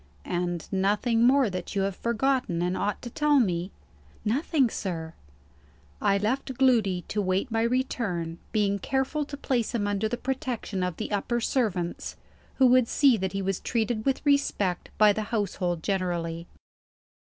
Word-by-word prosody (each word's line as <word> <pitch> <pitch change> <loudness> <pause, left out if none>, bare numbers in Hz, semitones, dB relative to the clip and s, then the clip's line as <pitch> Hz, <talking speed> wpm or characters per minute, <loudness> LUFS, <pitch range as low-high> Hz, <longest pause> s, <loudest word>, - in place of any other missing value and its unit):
"And 175 -1 -2
nothing 210 +5 +2
more 270 -1 +4
that 185 -1 -5
you 195 - +2
have 195 -1 -1
forgotten, 235 -6 0
and 180 +1 0
ought 205 +2 -2
to 240 - -5
tell 295 +1 +3
me?" 180 -5 0 0.6
"Nothing, 270 +4 +2
sir." 165 -7 -4 0.9
I 200 - +3
left 255 +6 -1
Gloody 220 -9 +3
to 210 - 0
wait 190 +5 0
my 225 0 +1
return; 225 -9 -1
being 200 -2 +1
careful 270 +7 -1
to 285 0 -7
place 245 -4 -1
him 210 -3 0
under 205 +1 0
the 245 - -2
protection 250 -7 -3
of 180 -2 -2
the 215 - -4
upper 210 +4 0
servants 205 -8 -1 0.4
who 265 - +4
would 250 -1 +5
see 275 -1 +4
that 190 -2 -3
he 195 0 -2
was 195 -1 -1
treated 225 -2 -1
with 270 +4 -1
respect 245 -10 +1
by 210 -1 +6
the 215 - -2
household 180 -6 -1
generally. 175 -3 -2
210 Hz, 160 wpm, -27 LUFS, 185-250 Hz, 0.9 s, by